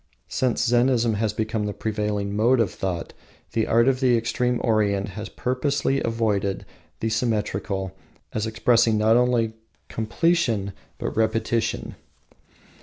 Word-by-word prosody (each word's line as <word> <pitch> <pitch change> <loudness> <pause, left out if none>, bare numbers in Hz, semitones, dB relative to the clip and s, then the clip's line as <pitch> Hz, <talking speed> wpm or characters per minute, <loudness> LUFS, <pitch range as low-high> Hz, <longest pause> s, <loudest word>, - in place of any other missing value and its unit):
Since 125 -1 0
Zennism 120 -1 +3
has 110 0 0
become 110 0 -2
the 105 - -4
prevailing 105 -2 -2
mode 120 +4 +3
of 115 -5 +2
thought, 90 -3 -4 0.4
the 110 - 0
art 115 +2 +4
of 130 -1 +2
the 125 -3 +4
extreme 120 +2 0
Orient 105 -3 +1
has 105 +2 -7
purposefully 135 +2 0
avoided 105 -4 -1 0.4
the 110 - 0
symmetrical 105 -4 -1 0.4
as 110 0 -1
expressing 115 0 +3
not 110 +1 +4
only 120 -2 +2 0.4
completion, 115 - 0 0.2
but - - -4
repetition. 115 +1 0
110 Hz, 125 wpm, -24 LUFS, 105-120 Hz, 0.4 s, art